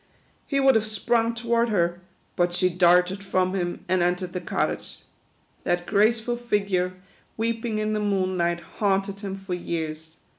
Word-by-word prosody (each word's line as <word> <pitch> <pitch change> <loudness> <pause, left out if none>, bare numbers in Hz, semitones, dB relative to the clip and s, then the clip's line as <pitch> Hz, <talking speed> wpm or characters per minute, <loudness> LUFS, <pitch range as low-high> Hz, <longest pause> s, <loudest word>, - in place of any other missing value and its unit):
He 275 - +1
would 270 -1 +6
have 220 -1 +2
sprung 230 +2 +1
toward 235 0 +1
her, 175 -3 +1 0.3
but 175 0 +1
she 180 +1 +2
darted 180 +2 +3
from 185 -1 +1
him, 175 -2 -3
and 185 0 +2
entered 180 +1 0
the 180 - -3
cottage. 175 - -3 0.6
That 175 0 0
graceful 225 +4 +2
figure, 200 -6 0 0.4
weeping 225 0 -1
in 215 0 0
the 215 - 0
moonlight, 185 -4 0 0.2
haunted 195 -1 +1
him 195 -2 -5
for 195 -1 -6
years. 160 -2 -4
195 Hz, 150 wpm, -25 LUFS, 180-220 Hz, 0.6 s, would